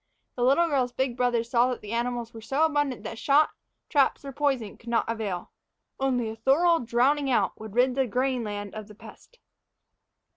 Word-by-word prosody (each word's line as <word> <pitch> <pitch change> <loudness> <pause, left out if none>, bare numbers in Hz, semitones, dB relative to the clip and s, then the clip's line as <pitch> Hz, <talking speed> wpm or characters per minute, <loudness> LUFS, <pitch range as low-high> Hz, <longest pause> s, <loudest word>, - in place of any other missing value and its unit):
The 245 - -5
little 280 +7 +4
girl's 265 -5 0
big 260 -1 -1
brothers 240 -1 0
saw 245 0 +4
that 250 - -4
the 210 - -8
animals 235 0 -2
were 225 - -9
so 270 +8 +1
abundant 290 -5 -1
that 225 - -6
shot, 290 +2 +4 0.4
traps, 280 -1 +2
or 275 - -5
poison 265 -6 -1
would 235 - -19
not 235 -1 +1
avail 215 -6 -4 0.5
only 255 -3 0
a - - -8
thorough 320 +9 +3
drowning 260 +5 +1
out 250 - +1
would 215 -1 -9
rid 250 +1 +3
the 265 0 +1
grain 255 +2 0
land 205 -1 -5
of 215 -1 -7
the 210 - -14
pest. - - -15
245 Hz, 190 wpm, -26 LUFS, 230-275 Hz, 0.5 s, little